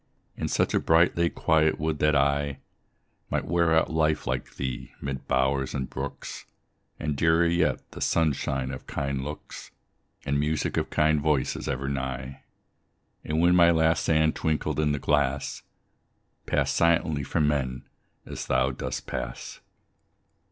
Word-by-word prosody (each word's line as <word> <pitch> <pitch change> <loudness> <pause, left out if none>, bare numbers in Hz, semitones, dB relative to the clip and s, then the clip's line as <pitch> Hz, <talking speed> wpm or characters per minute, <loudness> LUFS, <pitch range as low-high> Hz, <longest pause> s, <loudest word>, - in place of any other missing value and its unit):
In - - -3
such - - +1
a - - +3
bright, 80 +2 +4
late 85 0 0
quiet, 80 0 +2
would 80 -1 -1
that 75 0 +3
I 70 0 +1 0.7
Might - - -1
wear 85 0 +2
out 80 0 +3
life 80 -1 +1
like 65 0 -3
thee, 65 -1 -5
mid 70 -2 -5
bowers 65 +1 +1
and 65 -1 -2
brooks, 70 +1 -6 0.5
And, 75 -1 -2
dearer 80 +3 +3
yet, 85 -5 +1
the - - -9
sunshine 70 -4 0
of 65 - -8
kind 70 -2 -2
looks, 75 +2 -8 0.6
And 70 0 0
music 75 0 -1
of - - -1
kind 75 -1 +2
voices 75 -3 0
ever 70 0 -2
nigh; 65 -1 -4 0.8
And 75 +1 -1
when 90 +1 +5
my 85 -1 +7
last 80 -1 +3
sand 80 -1 +2
twinkled 80 -1 -1
in 75 -1 +2
the 75 - 0
glass, 70 -1 0 0.9
Pass - - +1
silently 85 -3 +2
from 75 +2 0
men, 65 -4 -1 0.4
as - - -6
thou 65 +1 +2
dost 65 - -5
pass. 60 -1 -6
75 Hz, 150 wpm, -26 LUFS, 65-80 Hz, 0.9 s, my